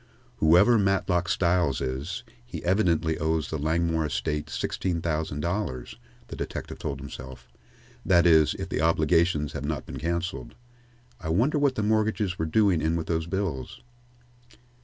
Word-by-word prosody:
"Whoever 90 +9 +5
Matlock 95 -3 +1
Styles 85 -5 +2
is, 70 - -4 0.2
he 120 - -8
evidently 85 -4 +2
owes 80 -1 -1
the 80 - -2
Langmore 80 +1 +1
estate 75 0 -2
sixteen 90 +1 -2
thousand 80 -3 -2
dollars," 85 - -3 0.3
the - - -7
detective - - -6
told 70 -3 -4
himself; 65 -2 -9 0.6
"that 85 -2 +4
is, 80 -3 +5
if - - -5
the - - -1
obligations 80 -1 +2
have 70 - -5
not 75 -2 -3
been - - -7
cancelled. 85 +3 -3 0.6
I 80 - -5
wonder 125 - +2
what 140 -2 +2
the 110 - -1
mortgages 110 -3 0
were 80 - 0
doing 95 -1 +3
in 80 +2 +1
with 80 -1 -2
those 80 0 -1
bills?" 85 -9 -3
85 Hz, 150 wpm, -26 LUFS, 75-95 Hz, 0.6 s, Whoever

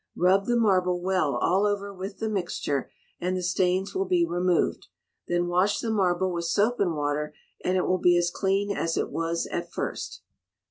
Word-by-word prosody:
Rub 190 +3 +3
the 240 - +2
marble 185 -5 +2
well 180 -6 +1
all 190 +11 +2
over 200 -1 -2
with 195 +1 -7
the 220 - -2
mixture, 175 -9 -2 0.3
and 180 +1 -1
the 180 - -3
stains 185 +2 +1
will 385 0 -1
be 355 -2 +3
removed; 180 - 0 0.4
then 175 0 +1
wash 180 +4 +2
the 225 - -2
marble 185 -3 +1
with 170 -1 -3
soap 210 +8 +1
and 175 -5 +1
water, 150 0 -2 0.3
and 185 +1 +1
it 180 - +1
will 185 0 +1
be 175 0 +4
as 175 0 +1
clean 200 +2 0
as 165 0 -1
it - - -1
was 165 0 -1
at - - -3
first. - - -5
185 Hz, 190 wpm, -26 LUFS, 175-200 Hz, 0.4 s, be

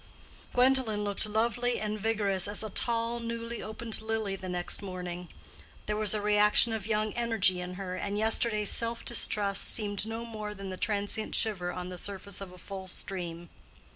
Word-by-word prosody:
Gwendolen 250 -4 +3
looked 205 +1 0
lovely 235 +3 0
and 215 0 -3
vigorous 200 -3 0
as 205 +1 -1
a 215 - -5
tall, 235 +1 0
newly 230 0 -5
opened 220 +1 +1
lily 220 -3 -2
the 185 -1 -7
next 180 +2 +2
morning: 180 -2 -6 0.6
there 210 - -1
was 215 0 +6
a 210 - -1
reaction 210 +2 +5
of 215 -2 -4
young 215 -1 0
energy 220 -6 +2
in 180 0 -6
her, 185 -1 -5
and 200 +2 -3
yesterday's 220 -1 +2
self 230 0 0
distrust 205 -4 +1
seemed 205 -1 0
no 225 +1 -5
more 215 -2 -6
than 195 -1 -7
the - - -4
transient 205 +1 -1
shiver 185 -6 0
on 180 0 -6
the 180 -1 -6
surface 200 0 -1
of 195 -2 -7
a 180 - -13
full 190 +1 -8
stream. 175 -2 -2
210 Hz, 175 wpm, -29 LUFS, 190-225 Hz, 0.6 s, was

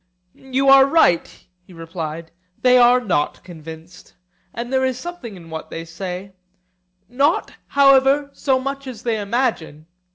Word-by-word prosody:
You 265 +1 -2
are 270 0 +7
right, 275 - +3 0.3
he 180 0 -18
replied; 165 -1 -7 0.3
they 250 0 +5
are 245 +1 +5
not 175 -11 -2
convinced: 165 0 -12 0.4
and 240 +2 -6
there 260 0 +2
is 260 -1 -1
something 265 - -8
in 165 -3 -14
what 160 0 -7
they 165 0 -7
say; 180 +3 -7 0.7
not, 280 +6 0 0.2
however, 275 +1 +4
so 265 -2 0
much 275 +1 -5
as 240 -5 -9
they 225 -3 -1
imagine. 200 - -2
235 Hz, 140 wpm, -20 LUFS, 170-270 Hz, 0.7 s, are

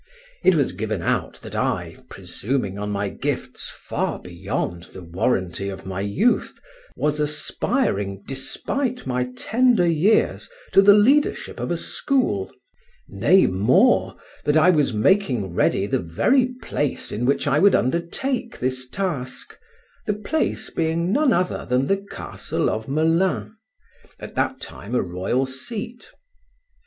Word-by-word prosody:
It 185 - +5
was 145 -4 +2
given 110 -5 -3
out - - -1
that - - -9
I, - - -1
presuming 105 -5 -3
on 105 0 -3
my 100 0 -1
gifts - - -4
far - - -3
beyond 90 -1 -4
the 95 - -11
warranty 95 +2 -1
of 95 -1 -8
my 95 0 -4
youth, 105 - +1 0.4
was 150 0 0
aspiring 100 -9 -1
despite 245 - -2
my 125 -1 -1
tender, 240 - +3
years 170 - +2 0.2
to - - +7
the 200 +1 +8
leadership 275 +8 +2
of - - -3
a - - 0
school; 245 - 0 0.6
nay, 120 - +4
more, 125 - +3 0.3
that 150 +1 +2
I 155 +4 +6
was 150 -6 +2
making 120 - +1
read 100 +2 +1
the - - +2
very 245 - +2 0.2
place 145 -2 -2
in 110 - -3
which 140 - +1
I 145 - +2
would 200 +2 +6
undertake 230 - -1
this 130 0 -2
task, 130 -11 -4 0.5
the 210 - +1
place 215 +10 -2
being 165 +2 0
none 290 0 +3
other 180 -3 0
than 125 +2 +2
the 195 - +2
castle - - -3
of 110 +1 -4
Melun, 165 +8 +1 0.6
at - - -9
that - - -1
time 110 +5 -7
a - - +3
royal 95 +9 -1
seat. 210 - -6
135 Hz, 140 wpm, -23 LUFS, -, 0.6 s, the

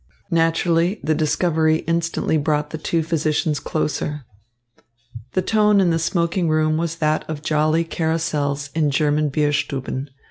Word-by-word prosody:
Naturally, 165 +3 +2
the 155 - +1
discovery 160 +1 +1
instantly 165 0 0
brought 150 0 0
the 160 - -5
two 165 +1 0
physicians 155 -1 0
closer. 150 -2 -3 1.1
The 185 - +1
tone 210 -2 +3
in 180 -3 +3
the 165 - +1
smoking 170 +1 0
room 155 0 +2
was 165 0 -2
that 155 -2 0
of 150 -1 -5
jolly 155 +1 +2
carousals 155 -4 -2
in 155 -2 +1
German 150 +1 +1
Bierstuben. 140 -2 -1
155 Hz, 135 wpm, -21 LUFS, 150-165 Hz, 1.1 s, tone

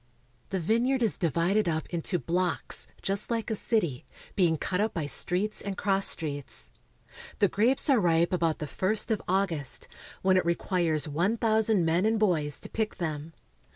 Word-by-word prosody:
The 190 - -1
vineyard 235 +8 +1
is 220 - +2
divided 175 +4 +1
up 160 -1 -1
into 175 +1 -1
blocks, 175 +1 0 0.2
just 195 +1 0
like 230 -1 -2
a - - 0
city, 170 - 0 0.3
being 170 -5 +3
cut 180 +5 -1
up 215 0 -1
by 160 -4 -1
streets 185 +8 -1
and 200 -1 -5
cross 195 -1 +1
streets. 145 -4 -3 0.7
The 200 - +4
grapes 230 +8 +3
are 270 -5 +5
ripe 170 -1 +2
about 165 -3 +1
the 155 +5 -3
ist 220 +1 0
of 215 - 0
August, 175 -7 -1 0.4
when 185 0 +4
it 185 - +3
requires 170 -3 0
one 175 +10 0
thou 220 -1 +3
sand 210 -5 +2
men 170 +5 +2
and 225 0 +2
boys 165 -9 +1
to - - -5
pick 220 -1 -2
them. 160 -2 -4
185 Hz, 175 wpm, -28 LUFS, 165-215 Hz, 0.7 s, are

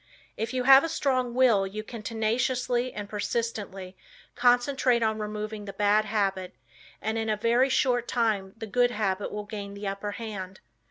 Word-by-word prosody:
If 225 +1 -3
you 255 -1 -1
have 270 +1 +8
a 330 - -1
strong 255 -6 0
will, 230 -7 +4
you 215 +2 -6
can 230 0 -8
tenaciously 240 +3 0
and 205 -1 -6
persistently 205 -3 -4 0.4
concentrate 245 0 +3
on 220 0 0
removing 210 0 -5
the 195 - -7
bad 205 +2 +3
habit 195 -3 -1 0.5
and 220 +1 -1
in 225 0 -2
a 215 - +1
very 235 +4 +3
short 245 -2 +1
time 210 -5 0
the 225 - -6
good 245 +3 +2
habit 205 -4 -2
will 210 0 -5
gain 200 -1 -7
the 200 0 -5
upper 200 +1 -4
hand. 195 -5 -6
220 Hz, 170 wpm, -27 LUFS, 205-245 Hz, 0.5 s, have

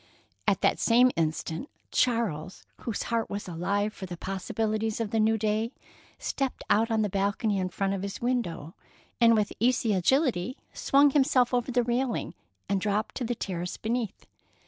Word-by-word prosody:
At - - +2
that - - +2
same 245 +2 +5
instant, 160 - -2 0.2
Charles, 200 -9 0
whose 225 -4 -3
heart 230 -1 -1
was 200 0 -4
alive 200 +5 -1
for 190 - -7
the 175 -1 -6
possibilities 215 +4 -2
of 220 -2 -2
the 225 - +1
new 220 +1 +3
day, 220 +3 0 0.4
stepped 270 -2 -2
out 225 +2 +4
on 220 -1 +2
the - - +1
balcony 200 +1 0
in 185 -1 -1
front 195 +2 -1
of 195 - -3
his 200 0 -5
window, 190 -11 -2 0.5
and 230 -1 +6
with 210 -2 +1
easy 235 -2 +2
agility 250 - +1 0.2
swung 280 +1 +4
himself 260 -3 +3
over 245 +1 +1
the 245 0 +2
railing 245 +1 -1 0.3
and 195 -1 0
dropped 210 +1 0
to 255 - -4
the 240 +1 -1
terrace 180 -4 -4
beneath. 230 0 -3
220 Hz, 170 wpm, -28 LUFS, 195-240 Hz, 0.5 s, and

